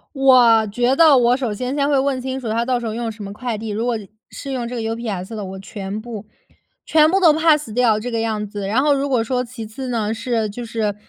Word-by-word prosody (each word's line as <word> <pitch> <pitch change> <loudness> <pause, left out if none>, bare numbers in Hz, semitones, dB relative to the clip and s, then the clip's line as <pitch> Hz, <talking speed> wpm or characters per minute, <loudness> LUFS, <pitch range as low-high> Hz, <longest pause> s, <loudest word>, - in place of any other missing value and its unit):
我 245 -5 +5
觉 245 +5 +1
得 310 -1 +6
我 245 -1 +4
首 245 -6 -2
先 250 +5 -3
先 285 -1 +1
会 285 -2 +3
问 265 -1 0
清 260 +1 -4
楚 240 -4 -5
他 230 +2 0
到 250 -1 +1
时 240 - -5
候 220 - -3
用 230 0 -3
什 215 -1 -9
么 200 - -7
快 235 +2 -4
递， 220 +1 -6
如 220 +3 -2
果 240 -2 0 0.3
是 275 - -7
用 245 -3 -3
这 250 - -6
个 230 - -3
UPS 225 -3 -4
的， 215 - -5
我 190 0 -7
全 195 +1 -6
部 220 -3 -8 0.6
全 310 -1 +4
部 385 - +3
都 345 -5 +6
Pass 305 -6 +2
掉 230 -2 +3
这 240 +3 -5
个 230 -1 -1
样 215 -2 -2
子。 205 -1 -6
然 230 +6 +2
后 295 0 +3
如 280 0 0
果 250 -4 +1
说 250 +2 -1
其 240 -2 -8
次 240 +5 -7
呢， 220 -3 -1
是 225 -1 -2
就 235 +3 -7
是， 220 -2 -2
235 Hz, 305 characters per minute, -20 LUFS, 215-260 Hz, 0.6 s, 得